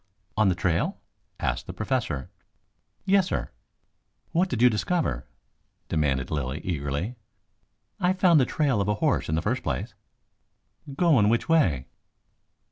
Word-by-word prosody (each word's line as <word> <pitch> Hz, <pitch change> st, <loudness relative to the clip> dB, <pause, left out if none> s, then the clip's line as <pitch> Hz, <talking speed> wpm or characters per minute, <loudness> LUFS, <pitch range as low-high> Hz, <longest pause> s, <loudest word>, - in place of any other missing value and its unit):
"On 110 Hz, -2 st, +4 dB
the 90 Hz, -, +1 dB
trail?" 85 Hz, -1 st, 0 dB, 0.4 s
asked -, -, -2 dB
the -, -, -6 dB
Professor. 65 Hz, -2 st, -2 dB, 0.7 s
"Yes, 195 Hz, -1 st, +4 dB
sir." -, -, -3 dB, 0.8 s
"What 180 Hz, +3 st, +2 dB
did 125 Hz, -, -2 dB
you 125 Hz, -, +7 dB
discover?" 105 Hz, -, 0 dB, 0.6 s
demanded 70 Hz, -5 st, 0 dB
Lilly 70 Hz, -1 st, -2 dB
eagerly. 80 Hz, -, -3 dB, 0.8 s
"I 180 Hz, +1 st, +2 dB
found 180 Hz, -4 st, +5 dB
the 130 Hz, -, +4 dB
trail 140 Hz, -9 st, +1 dB
of 100 Hz, -, -1 dB
a 105 Hz, -, +1 dB
horse 105 Hz, -, 0 dB
in 80 Hz, -, +1 dB
the 80 Hz, -, -1 dB
first 125 Hz, +4 st, 0 dB
place." 70 Hz, -5 st, -3 dB, 1.0 s
"Going 140 Hz, -, +4 dB
which 115 Hz, +1 st, +1 dB
way?" 85 Hz, -, +3 dB
105 Hz, 135 wpm, -26 LUFS, -, 1.0 s, you